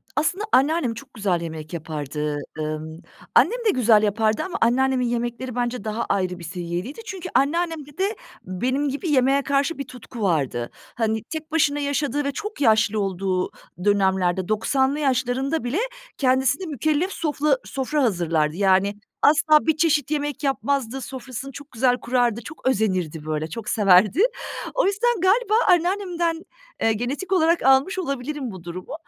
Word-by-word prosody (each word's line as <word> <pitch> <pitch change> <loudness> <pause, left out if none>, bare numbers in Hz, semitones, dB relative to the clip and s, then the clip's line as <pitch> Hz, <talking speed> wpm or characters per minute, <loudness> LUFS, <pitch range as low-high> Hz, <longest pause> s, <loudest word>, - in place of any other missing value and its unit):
Aslında 360 +7 0
anneannem 275 -2 +3
çok 265 +4 -12
güzel 195 -6 0
yemek 160 -2 -7
yapardı. 150 -2 -3 0.2
Imm, 155 +1 -4 0.4
annem 475 +8 +5
de - - +5
güzel 230 - +4
yapardı 215 +1 +1
ama 375 - -4
anneannemin 255 +2 +2
yemekleri 240 +1 -3
bence 245 -2 -2
daha 220 +2 -2
ayrı 180 -2 0
bir - - -10
seviyedeydi. 175 - -5
Çünkü 375 -4 -6
anneannemde 310 0 0
de 395 +3 0 0.3
benim 255 +10 -1
gibi 290 +6 -3
yemeğe 270 0 +3
karşı 280 +4 0
bir 280 - -3
tutku 245 -1 -10
vardı. 140 - 0 0.3
Hani, 220 -2 0
tek 315 +5 -7
başına 290 -2 +2
yaşadığı 285 0 -1
ve 280 - -1
çok 420 +4 -6
yaşlı 220 -3 +3
olduğu 190 -1 -1 0.4
dönemlerde, 190 -3 +2
90'lı 265 +6 +1
yaşlarında 265 +2 0
bile 250 +9 -1 0.4
kendisine 265 +5 +2
mükellef 310 - 0
sofla 305 - +1
sofra 275 +2 -1
hazırlardı. 165 -8 +1
Yani, 195 +1 +3 0.3
asla 305 +1 +5
bir 315 -1 +3
çeşit 310 -3 +2
yemek 290 -1 -2
yapmazdı, 270 -2 -1
sofrasını 260 +1 -7
çok 285 +3 -11
güzel 245 +1 +2
kurardı, 240 -2 0
çok 300 +3 -7
özenirdi 185 -10 0
böyle, 155 0 -2
çok 215 +5 -6
severdi. 200 - +4 0.5
O - - +2
yüzden 410 +2 +1
galiba 420 +4 +3
anneannemden, 350 -2 +1 0.4
eee, 225 - +3
genetik 265 - -4
olarak 340 -2 +3
almış 270 +8 +4
olabilirim 275 -4 -3
bu 185 -3 -10
durumu. 175 +5 -7
255 Hz, 150 wpm, -23 LUFS, 200-300 Hz, 0.5 s, annem